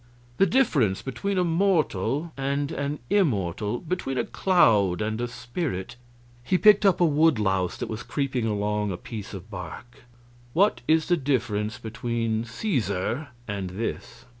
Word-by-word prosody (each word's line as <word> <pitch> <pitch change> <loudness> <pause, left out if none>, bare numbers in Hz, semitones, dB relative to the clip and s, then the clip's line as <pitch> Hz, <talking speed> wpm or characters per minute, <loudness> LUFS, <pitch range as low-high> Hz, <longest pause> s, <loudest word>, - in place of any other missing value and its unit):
The 195 - +5
difference 150 - +2
between 195 +9 -2
a 180 - +3
mortal 165 - +1
and 140 +1 -1
an 140 +1 -2
immortal? 105 - +1
between 160 -6 -3
a 120 - +2
cloud 105 - +3
and 110 +2 -2
a 120 - -1
spirit?" 120 - -4 0.5
He 185 +9 +2
picked 210 0 +6
up 190 - +3
a - - +6
wood 155 -2 +4
louse 95 -3 0
that - - -4
was 110 0 -5
creeping 130 -4 -2
along 105 -1 -1
a 90 - -4
piece 105 +1 -7
of 95 +3 -10
bark: 95 +7 -9 0.5
"What 200 +5 +3
is 160 0 +4
the 175 - +3
difference 115 -7 -1
between 115 -1 -2
Caesar 120 - -2 0.2
and 100 -3 -3
this?" 115 +4 -5
120 Hz, 150 wpm, -26 LUFS, 105-160 Hz, 0.5 s, picked